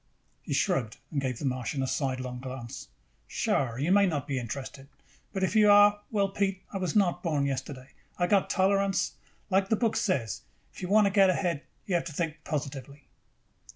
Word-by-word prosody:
He - - -9
shrugged 115 -5 0
and 145 -3 -1
gave 130 -3 -2
the 140 - -5
Martian 130 +1 -1
a - - -1
sidelong 130 -2 -2
glance. 130 -2 -7 0.4
"Sure, 120 -4 0
you 150 +7 0
may 200 0 +5
not 145 -5 -2
be 135 -2 -1
interested. 135 +3 -6 0.4
But 190 -2 -2
if 190 - 0
you 210 -1 +6
are, 205 0 +6
well, 200 -3 +1
Pete, 195 -1 -1
I 195 - -2
was 180 -4 -2
not 180 -4 +2
born 150 -5 0
yesterday. 135 -1 -4 0.3
I 175 - +2
got 195 +1 +2
tolerance. 195 +1 +2 0.4
Like 190 +1 +2
the 220 - +4
book 225 0 0
says, 125 - -1 0.3
if - - -11
you 180 - -3
want 210 +1 +5
to 200 - +2
get 195 -1 +5
ahead, 175 -5 0 0.2
you 195 - -3
have 170 -1 +1
got - - -4
to 160 - -7
think 155 -1 -3
positively." 140 -1 -5
165 Hz, 195 wpm, -28 LUFS, 135-195 Hz, 0.4 s, you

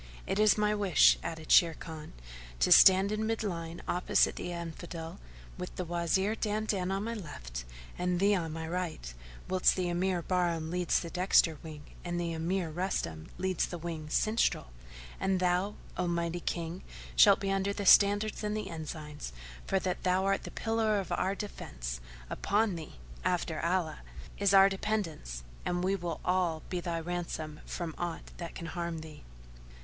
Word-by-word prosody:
"It 195 - -1
is 215 0 +5
my 210 0 +2
wish," 200 -5 +5
added 160 -1 -6
Sharrkan, 160 -2 +2 0.5
"to 60 - +3
stand 190 +1 +8
in 215 +1 -1
mid 225 0 -1
line 170 -4 -4
opposite 180 - +2
the 175 - -5
Infidel, 170 -1 -6 0.4
with - - -6
the 180 - -3
Wazir 175 +4 +1
Dandan 210 -4 -1
on 195 +1 -1
my 230 +1 -3
left 60 - -7 0.3
and 180 0 0
thee 200 +2 +4
on 165 -5 -1
my 160 0 -5
right, 165 - -4 0.3
whilst 185 -1 +3
the 180 -2 -1
Emir 175 0 0
Bahram 170 -3 0
leads 180 -1 +1
the 170 - -6
dexter 180 -3 +3
wing 155 -2 -9 0.2
and 175 0 -2
the 170 -1 -2
Emir 170 +1 -1
Rustam 155 - -3
leads 185 0 0
the 175 - -5
wing 160 -2 -5
sinistral; 215 - +1 0.5
and 190 -1 +1
thou, 180 +3 +1 0.2
O 180 - -1
mighty 170 0 -1
King, 170 +1 -3 0.3
shalt - - +7
be 195 -1 -1
under 195 +1 +1
the 200 0 -4
standards 205 +3 +5
and 210 0 -1
the 210 -2 -4
ensigns, 155 - -6 0.4
for 195 - +2
that 185 -1 -2
thou 185 +1 +2
art 195 0 +1
the - - -5
pillar 225 -2 0
of 195 - -5
our 190 +1 0
defence; 60 - -6 0.3
upon 205 - +1
thee, 160 -3 -7 0.3
after - - 0
Allah, - - 0 0.4
is 200 -1 +3
our 195 0 +8
dependence 190 - -3 0.2
and 175 0 -1
we 190 +2 +2
will 170 -4 -4
all 180 -3 +1
be 180 - -1
thy 170 -1 -2
ransom 165 -3 -4
from 170 -3 -4
aught 175 -2 -4
that 170 -1 -7
can 170 - -6
harm 170 -1 -4
thee." 155 -2 -11
175 Hz, 170 wpm, -31 LUFS, 165-195 Hz, 0.5 s, stand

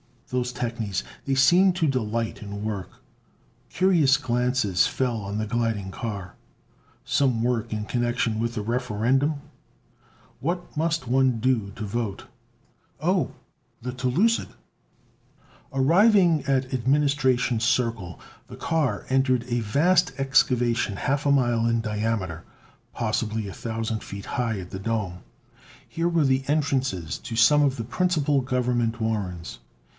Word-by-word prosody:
Those 125 -1 -1
technies 115 -5 -3 0.2
they 135 - 0
seemed 175 +8 +5
to 165 -4 +1
delight 115 -4 -2
in 100 0 -6
work! 105 -4 -3 0.8
Curious 170 -8 +4
glances 125 -7 +1
fell 125 -3 -1
on 100 -1 -4
the 110 - -1
gliding 110 -3 -1
car. 100 -4 -6 0.7
Some 125 -5 +1
work 120 -2 -1
in 105 0 -2
connection 120 -2 0
with 115 +1 -2
the 110 - -2
Referendum? 125 +6 0 1.0
What 175 +4 -3
must 160 -2 0
one 130 -1 +2
do 115 -4 +1
to 110 - -5
vote? 105 -1 -3 0.7
Oh, - - +1 0.5
the 125 +2 -4
telucid! 130 - +1 1.2
Arriving 170 +3 +4
at 135 -1 0
Administration 130 -2 +2
Circle, 115 -7 0 0.3
the - - -10
car 160 -5 -1
entered 130 -2 +2
a 120 0 +1
vast 170 - +2
excavation 120 -5 +2
half 140 +7 -1
a - - +4
mile 120 -4 +2
in 115 0 +1
diameter, 105 -6 -2 0.5
possibly 110 -1 -1
a 95 - -7
thousand 110 -1 -3
feet 100 0 -8
high 115 -4 -2
at 90 - -11
the 95 - -5
dome. 100 -4 -2 0.7
Here 165 +1 -1
were 165 -3 +2
the 130 0 +1
entrances 135 - 0
to 115 - -6
some 150 +6 +5
of 140 -2 +2
the 115 - -4
principal 150 +1 +1
Government 125 -2 0
warrens. 95 - -3
120 Hz, 130 wpm, -25 LUFS, 110-135 Hz, 1.2 s, seemed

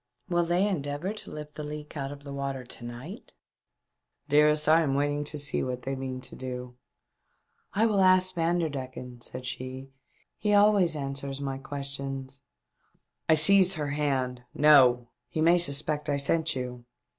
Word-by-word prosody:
" 125 - -36
Will 175 0 +3
they 175 +4 +1
endeavour 150 +1 -3
to 215 - -9
lift 150 0 -8
the 150 - -7
leak 150 +1 -8
out 140 -1 -4
of 145 0 -11
water 140 -2 -4
to 120 - -10
night 130 - -9 0.3
?" - - -57
" - - -53
Dearest, 150 +1 +4
I 160 +1 +6
am 140 -4 0
waiting 145 +1 0
to 150 +1 -2
see 145 -1 +1
what 125 -1 -4
they 135 - -3
mean 130 -1 -5
to 130 - -7
do." 125 -1 -7 0.5
" - - -44
I 215 +3 +3
will 210 -3 +2
ask 185 0 +4
Vanderdecken," 140 -8 -3
said 125 +1 -7
she, 130 +1 -6 0.2
" - - -39
he 210 -1 +2
always 205 -5 +4
answers 140 -1 -4
my 135 -1 -4
questions." 135 -1 -5 0.9
I 160 - +7
seized 190 +4 +7
her 150 -5 -2
hand. 135 -4 -1
" - - -43
No! 125 -5 +5 0.2
He - - -4
may 170 +3 +4
sus 145 -3 +3
pect 150 0 -3
I 145 - +1
sent 160 +2 +1
you. 125 -1 -5
145 Hz, 180 wpm, -28 LUFS, 130-160 Hz, 0.9 s, I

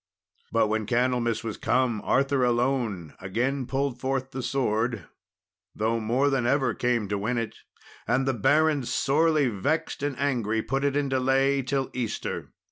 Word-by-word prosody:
But 115 -1 +3
when 110 -1 -1
Candlemas 120 -1 +1
was 110 -3 -4
come, 125 -4 +1
Arthur 135 -1 +2
alone 120 - 0
again 125 +8 -1
pulled 135 -2 -1
forth 135 0 -2
the 130 - -4
sword, 120 -3 -1 0.7
though 115 +2 0
more 125 +6 +1
than 130 -3 +1
ever 130 -3 +2
came 120 -4 0
to 100 -1 -1
win 115 +5 -1
it; 115 -1 -3 0.5
and 125 +4 +2
the 135 - +2
barons, 145 +3 +2
sorely 150 0 +2
vexed 145 +10 -1
and 145 -3 -2
angry, 115 -6 0
put 135 +2 -1
it 140 -1 +1
in 145 -1 +1
delay 135 +1 +2
till 135 +1 -2
Easter. 120 -4 -3
125 Hz, 155 wpm, -26 LUFS, 115-135 Hz, 0.7 s, But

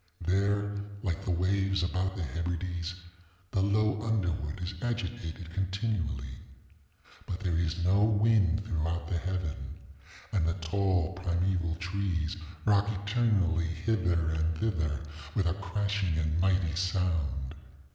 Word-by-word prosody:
There, 100 +2 +1 0.2
like 95 0 -1
the - - -4
waves 95 +1 +2
about 90 +2 0
the 95 - -2
Hebrides, 85 +3 -2 0.6
the 95 - +2
low 105 +1 +2
underwood 90 -8 -1
is 90 +2 -3
agitated 90 -8 -3
continually. 95 +1 -2 0.9
But 90 +2 -4
there 90 -4 0
is 85 +1 0
no 95 +3 +4
wind 105 -3 +4
throughout 85 -3 -1
the 85 0 0
heaven. 90 -3 -3 0.6
And 90 -6 +2
the 85 - +1
tall 95 0 +1
primeval 90 -2 0
trees 90 -1 -1 0.3
rock 100 -1 +4
eternally 100 -5 +2
hither 85 -3 +1
and 80 0 0
thither 80 -8 0 0.3
with 100 - +2
a 85 - +2
crashing 100 -2 -1
and 80 0 +1
mighty 90 -3 +2
sound. 85 -7 0
90 Hz, 125 wpm, -30 LUFS, 85-100 Hz, 0.9 s, no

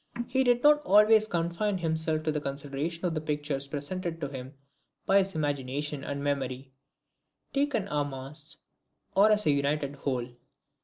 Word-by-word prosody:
He 265 +1 +2
did 245 -1 +3
not 295 0 +6
always 215 -2 +5
confine 175 +3 -1
himself 160 -2 -1
to 155 - +1
the 150 -1 -2
consideration 145 +5 -4
of 175 - 0
the 155 - -2
pictures 145 -2 -2
presented 165 +4 -4
to 140 -4 -3
him 130 0 -8 0.5
by 195 +1 +5
his 195 -2 -1
imagination 145 -1 -2
and 140 0 -4
memory, 135 -2 -2 0.8
taken 275 -8 0
en 145 -3 -1
masse, 140 +3 -9 0.6
or 200 +3 +6
as 210 0 +2
a 150 - +5
united 140 0 0
whole. 130 -4 -2
150 Hz, 155 wpm, -29 LUFS, 140-190 Hz, 0.8 s, not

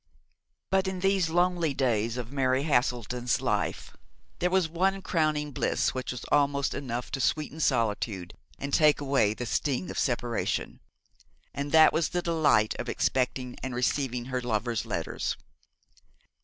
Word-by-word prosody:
But 190 0 +2
in 190 -1 -3
these 195 -3 +2
lonely 175 -3 +1
days 115 -3 0
of 120 0 -5
Mary 130 -1 +1
Haselden's 125 -4 0
life - - -2 0.4
there 180 - +2
was 185 -2 +2
one 190 +4 0
crowning 155 -3 0
bliss - - 0
which 130 0 -3
was 125 - -7
almost 140 -1 +2
enough 120 -3 -4
to 135 - -2
sweeten 155 +3 -1
solitude, 110 - 0 0.2
and 140 0 -5
take 150 -2 +5
away 135 -7 +2
the 125 - -4
sting 140 +7 -1
of - - -3
separation; 120 -2 -1 0.7
and 140 +1 -4
that 160 +1 +7
was 160 -1 +1
the 175 0 -2
delight 155 -10 +3
of 120 - -4
expecting 125 -1 -1
and 130 -2 -4
receiving 125 -1 0
her 130 0 -2
lover's 115 -1 -1
letters. - - -3
135 Hz, 145 wpm, -28 LUFS, 120-160 Hz, 0.7 s, that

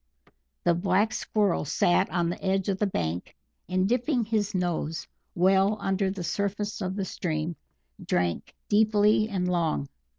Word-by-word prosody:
The 175 - +4
Black 190 +5 +1
Squirrel 205 -5 0
sat 175 +5 +2
on 175 -1 0
the - - -7
edge 195 0 +1
of 190 -1 -1
the 210 - +2
bank, 85 - -3 0.3
and 185 +1 +2
dipping 245 +1 +1
his 210 -2 -1
nose 170 -3 -1 0.3
well 190 +3 +3
under 195 0 0
the 190 -2 -4
surface 205 +3 -2
of 185 0 -2
the 195 -2 -2
stream, 160 -2 -3 0.5
drank 85 -1 -1
deeply 215 0 +3
and 185 -3 -1
long. 165 - 0
190 Hz, 145 wpm, -27 LUFS, 175-205 Hz, 0.5 s, The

